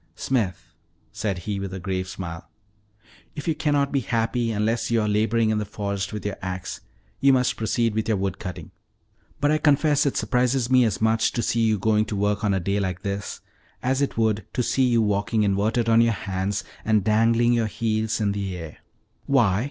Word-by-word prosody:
"Smith," 110 Hz, -9 st, -2 dB, 0.4 s
said 100 Hz, -4 st, -2 dB
he, 105 Hz, -2 st, -2 dB
with 95 Hz, -1 st, -5 dB
a -, -, -5 dB
grave 95 Hz, 0 st, -3 dB
smile, 85 Hz, -3 st, -7 dB, 0.9 s
"if 150 Hz, -, -6 dB
you 165 Hz, -, +3 dB
cannot 145 Hz, -2 st, +1 dB
be 140 Hz, -, +2 dB
happy 115 Hz, 0 st, -1 dB
unless 110 Hz, +2 st, 0 dB
you 115 Hz, -1 st, +2 dB
are 105 Hz, -, 0 dB
laboring 110 Hz, +2 st, +2 dB
in 110 Hz, -, +1 dB
the -, -, -1 dB
forest 100 Hz, -2 st, -4 dB
with 105 Hz, -1 st, -6 dB
your 105 Hz, -, -3 dB
ax 95 Hz, -1 st, -5 dB, 0.4 s
you 140 Hz, +1 st, +5 dB
must 125 Hz, -1 st, +2 dB
proceed 115 Hz, 0 st, 0 dB
with 110 Hz, 0 st, -1 dB
your 110 Hz, -2 st, +1 dB
wood 95 Hz, -1 st, -2 dB
cutting; 90 Hz, -4 st, -7 dB, 0.7 s
but 145 Hz, +2 st, +2 dB
I 155 Hz, -, +2 dB
confess 145 Hz, -1 st, +3 dB
it 140 Hz, -, -1 dB
surprises 125 Hz, 0 st, +1 dB
me 125 Hz, -1 st, +6 dB
as 110 Hz, -3 st, -1 dB
much 110 Hz, 0 st, +2 dB
to 120 Hz, -, -1 dB
see 115 Hz, -, +1 dB
you 110 Hz, -1 st, +2 dB
going 105 Hz, +2 st, +2 dB
to 105 Hz, -, -4 dB
work 105 Hz, +1 st, 0 dB
on 105 Hz, -, +2 dB
a -, -, +1 dB
day 100 Hz, +3 st, -1 dB
like 95 Hz, -2 st, -3 dB
this, 100 Hz, -1 st, -4 dB, 0.4 s
as 130 Hz, +2 st, +1 dB
it 140 Hz, -, -1 dB
would 110 Hz, -2 st, +1 dB
to 125 Hz, -, 0 dB
see 130 Hz, +2 st, +2 dB
you 120 Hz, -2 st, +3 dB
walking 105 Hz, +1 st, +1 dB
inverted 105 Hz, +4 st, +1 dB
on 115 Hz, 0 st, +5 dB
your 115 Hz, -1 st, +3 dB
hands, 95 Hz, 0 st, -3 dB, 0.2 s
and 110 Hz, -2 st, +2 dB
dangling 115 Hz, +3 st, +3 dB
your 115 Hz, -2 st, +1 dB
heels 110 Hz, 0 st, -1 dB
in 105 Hz, -2 st, +1 dB
the 100 Hz, -2 st, -3 dB
air." 80 Hz, -3 st, -8 dB, 0.5 s
"Why?" 115 Hz, -9 st, +3 dB
110 Hz, 205 wpm, -24 LUFS, 100-120 Hz, 0.9 s, me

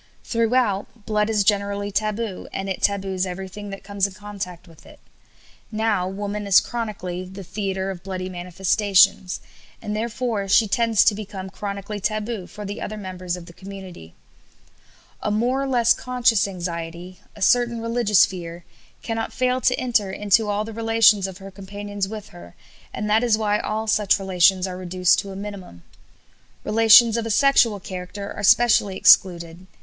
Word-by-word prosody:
Throughout, 230 Hz, -2 st, 0 dB
blood 210 Hz, 0 st, 0 dB
is 210 Hz, -2 st, +2 dB
generally 200 Hz, 0 st, 0 dB
taboo, 215 Hz, 0 st, -3 dB
and 195 Hz, -, -4 dB
it 190 Hz, -, -4 dB
taboos 190 Hz, -2 st, 0 dB
everything 190 Hz, +3 st, -7 dB
that 195 Hz, 0 st, -8 dB
comes 200 Hz, 0 st, -1 dB
in 195 Hz, -, -12 dB
contact 190 Hz, -3 st, -8 dB
with 165 Hz, -2 st, -18 dB
it. -, -, -16 dB, 0.7 s
Now 215 Hz, -4 st, 0 dB
woman 205 Hz, +2 st, -4 dB
is 195 Hz, -, +7 dB
chronically 205 Hz, -6 st, -5 dB
"the 190 Hz, +2 st, -9 dB
theatre 190 Hz, 0 st, -3 dB
of 180 Hz, -2 st, -9 dB
bloody 185 Hz, -1 st, -5 dB
manifestations," 185 Hz, +1 st, +2 dB, 0.4 s
and 210 Hz, -, -5 dB
therefore 225 Hz, -2 st, -2 dB
she 215 Hz, +3 st, +4 dB
tends 225 Hz, +1 st, +3 dB
to 220 Hz, -, +5 dB
become 195 Hz, -2 st, -7 dB
chronically 200 Hz, +1 st, -5 dB
taboo 215 Hz, -1 st, -3 dB
for 210 Hz, -, -9 dB
the 205 Hz, +1 st, -6 dB
other 215 Hz, -, -5 dB
members 185 Hz, -3 st, -5 dB
of 175 Hz, -, -10 dB
the 170 Hz, -, -14 dB
community. 190 Hz, -, -11 dB, 1.1 s
"A -, -, -1 dB
more 240 Hz, +6 st, 0 dB
or 275 Hz, -, -2 dB
less 240 Hz, -3 st, +4 dB
conscious 245 Hz, -4 st, +1 dB
anxiety, 175 Hz, -1 st, -6 dB, 0.2 s
a 205 Hz, -, -13 dB
certain 240 Hz, +1 st, +3 dB
religious 230 Hz, -3 st, +3 dB
fear, 170 Hz, -2 st, -8 dB, 0.4 s
cannot 225 Hz, -1 st, -3 dB
fail 255 Hz, 0 st, 0 dB
to 250 Hz, -, +2 dB
enter 235 Hz, -6 st, +1 dB
into 210 Hz, +2 st, +1 dB
all 205 Hz, +1 st, -1 dB
the 225 Hz, -, -8 dB
relations 225 Hz, -3 st, +4 dB
of 190 Hz, -1 st, -9 dB
her 195 Hz, 0 st, -11 dB
companions 200 Hz, +1 st, -5 dB
with 215 Hz, 0 st, -8 dB
her, 85 Hz, 0 st, -14 dB, 0.4 s
and 210 Hz, -, -4 dB
that 215 Hz, +3 st, +3 dB
is 230 Hz, -3 st, +3 dB
why 210 Hz, -1 st, 0 dB
all 215 Hz, +1 st, -3 dB
such 215 Hz, -2 st, +2 dB
relations 190 Hz, -1 st, +3 dB
are 185 Hz, -1 st, -5 dB
reduced 180 Hz, 0 st, +2 dB
to 200 Hz, -, -5 dB
a -, -, -8 dB
minimum. 195 Hz, -, -8 dB, 0.8 s
Relations 225 Hz, +1 st, +6 dB
of 230 Hz, -, -2 dB
a -, -, -4 dB
sexual 235 Hz, -3 st, +3 dB
character 185 Hz, +2 st, -7 dB
are -, -, -7 dB
specially 205 Hz, -2 st, +4 dB
excluded. 170 Hz, -1 st, +3 dB
200 Hz, 165 wpm, -22 LUFS, 185-220 Hz, 1.1 s, is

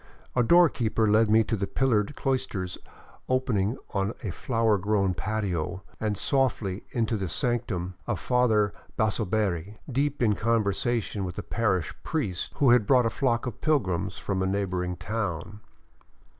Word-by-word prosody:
A 125 Hz, -, +4 dB
doorkeeper 120 Hz, -7 st, +4 dB
led 110 Hz, +1 st, +4 dB
me 110 Hz, +1 st, +6 dB
into 115 Hz, -, -1 dB
pillared 125 Hz, -2 st, +1 dB
cloisters 105 Hz, -9 st, -2 dB, 0.5 s
opening 125 Hz, -4 st, +1 dB
on 100 Hz, +2 st, -1 dB
a 100 Hz, -, -2 dB
flower 115 Hz, +1 st, +1 dB
grown 100 Hz, -1 st, +1 dB
patio 95 Hz, -3 st, -2 dB, 0.2 s
and 105 Hz, -2 st, -1 dB
softly 115 Hz, -8 st, 0 dB
into 115 Hz, -2 st, 0 dB
the 95 Hz, -3 st, -3 dB
sanctum 95 Hz, -1 st, -1 dB
of 110 Hz, -7 st, -1 dB
Father 110 Hz, -4 st, +2 dB, 0.2 s
Basoberri, 105 Hz, -3 st, 0 dB
deep 140 Hz, 0 st, 0 dB
in 110 Hz, -3 st, +4 dB
conversation 110 Hz, -1 st, 0 dB
with 90 Hz, -2 st, -5 dB
a 105 Hz, -, -4 dB
parish 95 Hz, -8 st, 0 dB
priest 110 Hz, -, -2 dB
who 135 Hz, -4 st, +4 dB
had 120 Hz, -4 st, +4 dB
brought 125 Hz, -3 st, +5 dB
a 115 Hz, -, +1 dB
flock 120 Hz, -4 st, 0 dB
of 120 Hz, -5 st, -6 dB
pilgrims 95 Hz, -, 0 dB
from 95 Hz, -2 st, -2 dB
a 95 Hz, -, +1 dB
neighboring 90 Hz, -2 st, -1 dB
town. 100 Hz, -2 st, -4 dB
110 Hz, 145 wpm, -27 LUFS, 95-120 Hz, 0.5 s, me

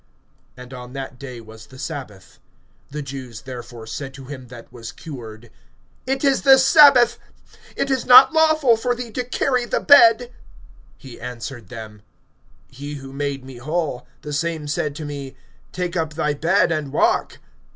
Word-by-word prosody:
And 125 Hz, +1 st, -11 dB
on 125 Hz, 0 st, -10 dB
that 135 Hz, -2 st, -7 dB
day 130 Hz, -4 st, -8 dB
was 110 Hz, 0 st, -14 dB
the 130 Hz, -, -15 dB
sabbath. 130 Hz, -, -8 dB, 0.5 s
(10)The 150 Hz, 0 st, -5 dB
Jews 130 Hz, -4 st, -8 dB
therefore 120 Hz, -3 st, -9 dB
said 135 Hz, +3 st, -7 dB
to 135 Hz, -1 st, -11 dB
him 130 Hz, -2 st, -9 dB
that 120 Hz, 0 st, -13 dB
was 115 Hz, -2 st, -8 dB
cured: 120 Hz, -6 st, -10 dB, 0.6 s
It 270 Hz, +1 st, -1 dB
is 275 Hz, -1 st, +3 dB
the 270 Hz, -1 st, +7 dB
sabbath; 270 Hz, -3 st, +6 dB, 0.6 s
it 275 Hz, -, -1 dB
is 260 Hz, -2 st, 0 dB
not 255 Hz, +5 st, +9 dB
lawful 310 Hz, -6 st, +4 dB
for 245 Hz, +2 st, -1 dB
thee 240 Hz, -1 st, -7 dB
to 250 Hz, +3 st, -3 dB
carry 250 Hz, 0 st, 0 dB
the -, -, -1 dB
bed. 245 Hz, -2 st, +6 dB, 0.7 s
(11)He 130 Hz, -3 st, -11 dB
answered 120 Hz, -3 st, -7 dB
them: 110 Hz, -3 st, -10 dB, 0.7 s
He 145 Hz, +3 st, -7 dB
who 135 Hz, -1 st, -10 dB
made 140 Hz, -1 st, -4 dB
me 130 Hz, -2 st, -11 dB
whole, 145 Hz, -2 st, -3 dB, 0.2 s
the 150 Hz, -, -6 dB
same 160 Hz, 0 st, -2 dB
said 145 Hz, 0 st, -2 dB
to 155 Hz, 0 st, -6 dB
me: 140 Hz, -2 st, -7 dB, 0.4 s
Take 180 Hz, -1 st, -4 dB
up 160 Hz, -3 st, -2 dB
thy 150 Hz, -2 st, 0 dB
bed, 170 Hz, +6 st, +2 dB
and 155 Hz, -4 st, -2 dB
walk. -, -, +1 dB
145 Hz, 165 wpm, -21 LUFS, -, 0.7 s, not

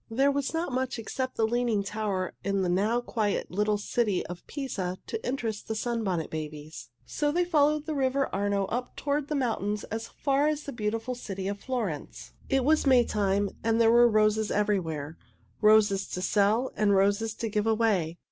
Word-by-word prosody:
There 270 Hz, +5 st, +3 dB
was 280 Hz, -1 st, -1 dB
not 325 Hz, -2 st, -2 dB
much 255 Hz, 0 st, -1 dB
except 255 Hz, +3 st, -4 dB
the 225 Hz, -, +2 dB
Leaning 235 Hz, -3 st, +1 dB
Tower 195 Hz, -3 st, -2 dB
in 200 Hz, -1 st, 0 dB
the 180 Hz, -, 0 dB
now 210 Hz, +7 st, +1 dB
quiet 215 Hz, -4 st, -2 dB
little 210 Hz, +3 st, +1 dB
city 210 Hz, -1 st, 0 dB
of 175 Hz, 0 st, -8 dB
Pisa 195 Hz, -11 st, -4 dB
to 450 Hz, -, -5 dB
interest 230 Hz, -5 st, -3 dB
the 220 Hz, -, -2 dB
Sunbonnet 215 Hz, -8 st, -2 dB
Babies, 150 Hz, -5 st, -7 dB, 0.2 s
so 295 Hz, -1 st, -1 dB
they 350 Hz, +3 st, +1 dB
followed 300 Hz, -2 st, +2 dB
the 315 Hz, -, -2 dB
river 275 Hz, -1 st, +1 dB
Arno 200 Hz, 0 st, 0 dB
up 245 Hz, +5 st, -4 dB
toward 285 Hz, 0 st, -1 dB
the 300 Hz, -, -2 dB
mountains 210 Hz, -6 st, -1 dB
as 225 Hz, +1 st, -3 dB
far 280 Hz, +1 st, +1 dB
as 305 Hz, -1 st, -1 dB
the 280 Hz, -, -6 dB
beautiful 225 Hz, +2 st, -2 dB
city 195 Hz, -6 st, -5 dB
of 200 Hz, 0 st, -3 dB
Florence. 215 Hz, -, -4 dB, 0.2 s
It 270 Hz, -2 st, +2 dB
was 310 Hz, 0 st, +3 dB
Maytime, 205 Hz, -6 st, +3 dB
and 225 Hz, 0 st, +2 dB
there 225 Hz, -1 st, +5 dB
were 240 Hz, 0 st, +6 dB
roses 215 Hz, 0 st, +2 dB
everywhere 165 Hz, -8 st, -1 dB, 0.4 s
roses 210 Hz, -2 st, +4 dB
to 180 Hz, -, -4 dB
sell 210 Hz, +6 st, +2 dB
and 205 Hz, -2 st, +3 dB
roses 205 Hz, +3 st, +2 dB
to 230 Hz, -, -3 dB
give 210 Hz, 0 st, -1 dB
away. 210 Hz, -7 st, +1 dB
220 Hz, 180 wpm, -28 LUFS, 200-255 Hz, 0.4 s, were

